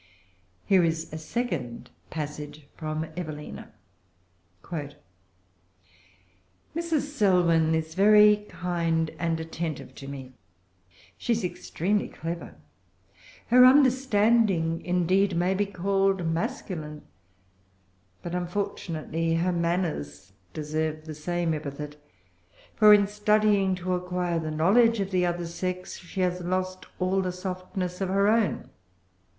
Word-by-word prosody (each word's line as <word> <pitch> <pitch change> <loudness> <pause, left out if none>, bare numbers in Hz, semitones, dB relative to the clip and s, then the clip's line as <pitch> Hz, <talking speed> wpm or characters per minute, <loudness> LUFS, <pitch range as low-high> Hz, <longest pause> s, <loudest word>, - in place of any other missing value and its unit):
Here 190 -3 +4
is 165 -1 -1
a 155 - -4
second 155 - -4 0.2
passage 150 -1 -6
from 155 0 -3
Evelina:— 155 -4 -7 0.9
"Mrs. 145 -4 -5 2.1
Selwyn 180 - +2
is 160 0 -3
very 210 +2 +6
kind 165 -2 -1
and 165 -1 0
attentive 160 -2 -5
to 135 - -10
me. 135 -2 -8 0.9
She 240 - +1
is 225 -1 -2
extremely 180 +2 -1
clever. 170 +1 -6 0.9
Her 250 +2 +8
understanding, 230 - +4
indeed, 180 +2 +2
may 175 +2 +2
be 200 +1 0
called 195 -1 +1
masculine; 165 - -3 1.2
but 175 - -5
unfortunately 165 -3 -2
her 175 +2 +1
manners 165 - -2 0.2
deserve 155 +2 -3
the 155 - -6
same 170 +2 -1
epithet; 150 -1 -6 0.8
for, 215 -1 +7
in 205 -1 +7
studying 210 -2 +2
to 185 0 -2
acquire 180 -1 -1
the 160 -1 -4
knowledge 210 +9 +4
of 195 0 -2
the 180 -1 +2
other 175 0 -2
sex, 180 +2 -4
she 185 +1 -5
has 180 0 0
lost 185 +1 -2
all 190 +1 +1
the 185 -1 -2
softness 185 0 -5
of 190 - 0
her 200 +1 +3
own. 220 -1 +1
180 Hz, 110 wpm, -27 LUFS, 160-195 Hz, 2.1 s, Her